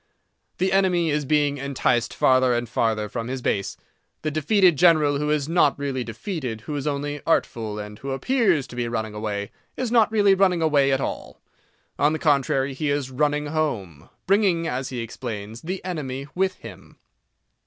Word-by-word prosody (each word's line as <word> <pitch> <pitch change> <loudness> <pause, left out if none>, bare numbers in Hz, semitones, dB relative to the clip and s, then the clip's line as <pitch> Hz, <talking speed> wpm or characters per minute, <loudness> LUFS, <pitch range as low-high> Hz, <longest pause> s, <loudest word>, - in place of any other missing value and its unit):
The 190 +1 +1
enemy 180 -4 +2
is 150 -1 0
being 145 -1 +1
enticed 130 -3 0
farther 130 -1 +3
and 120 0 -2
farther 110 -1 0
from 115 +2 -5
his 130 0 -4
base. 100 -1 -1 0.5
The 155 - -1
defeated 175 +4 +3
general—who 150 -3 +3
is 150 -2 0
not 170 +2 +3
really 135 -3 -2
defeated, 120 - -5
who 150 +6 -5
is 145 0 -3
only 145 0 -3
artful, 110 -9 0
and 105 0 -7
who 135 - -6
appears 175 - +1
to - - -12
be 120 -1 -2
running 110 -2 -3
away, 105 -1 -4 0.3
is 255 -3 -2
not 225 -3 +4
really 205 -3 +4
running 185 -3 +2
away 145 -3 +3
at 135 0 +1
all. - - -5 0.6
On 145 +2 +3
the - - -1
contrary, 140 -3 +1
he 145 +2 -2
is 140 -2 -1
running 150 +2 0
home—bringing, 155 - -1
as 130 +1 -3
he 125 -2 -4
explains, 115 -1 -6
the 185 +3 -5
enemy 140 -7 -4
with 190 0 0
him. - - -13
140 Hz, 170 wpm, -24 LUFS, 120-165 Hz, 0.6 s, not